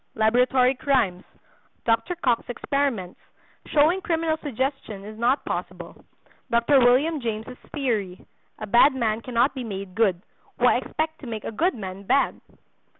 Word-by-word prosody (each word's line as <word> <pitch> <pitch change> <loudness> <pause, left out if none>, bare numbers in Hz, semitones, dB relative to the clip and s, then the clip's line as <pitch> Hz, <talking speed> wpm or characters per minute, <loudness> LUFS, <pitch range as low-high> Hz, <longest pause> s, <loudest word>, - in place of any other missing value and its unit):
—Laboratory 250 +3 +3
Crimes.—Dr. 235 - -2
Cocke's 245 -1 +1
Experiments 245 -7 -2 0.5
Showing 315 +6 +3
Criminal 325 -2 0
Suggestion 265 -7 -4
Is 215 +1 -9
not 240 +5 +1
Possible.—Dr. 235 +4 -2
William 265 +5 +3
James' 225 +1 -4 0.2
Theory.—A 215 - -4
Bad 240 +6 +5
Man 225 -3 0
Cannot 245 +3 +1
Be 260 -2 -5
Made 195 -4 -6
Good, 190 -4 +1 0.3
Why - - +4
Expect 315 0 -4
to 270 - -9
Make 220 -2 -5
a - - -4
Good 340 - 0
Man 190 -3 -7
Bad? 260 +8 +1
245 Hz, 125 wpm, -24 LUFS, 215-280 Hz, 0.5 s, Bad